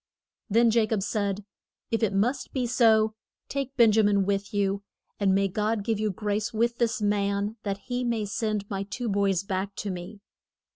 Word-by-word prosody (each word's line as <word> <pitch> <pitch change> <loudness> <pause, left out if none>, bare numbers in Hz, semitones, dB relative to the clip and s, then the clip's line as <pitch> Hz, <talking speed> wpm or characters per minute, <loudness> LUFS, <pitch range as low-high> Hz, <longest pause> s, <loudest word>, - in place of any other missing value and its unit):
Then 230 +2 +4
Ja 225 -1 +3
cob 210 -3 0
said, 200 -1 -2 0.5
If 225 - +1
it 220 -3 +2
must 235 +7 0
be 255 -2 0
so, 220 -2 +4 0.4
take 275 -1 -3
Ben 230 -3 +7
ja 220 +1 +4
min 200 -2 +3
with 200 0 -1
you, 200 -1 0 0.4
and 195 -2 +3
may 195 0 +3
God 210 +2 -1
give 220 -1 -1
you 215 0 +1
grace 210 +2 -2
with 235 +1 0
this 230 -2 +1
man 205 +1 0
that 200 -1 -3
he 245 0 -2
may 230 -3 0
send 210 -1 -2
my 195 -1 -3
two 220 +5 -4
boys 200 -3 +1
back 195 0 -3
to 205 - -3
me. 185 +3 -7
210 Hz, 190 wpm, -27 LUFS, 200-225 Hz, 0.5 s, Ben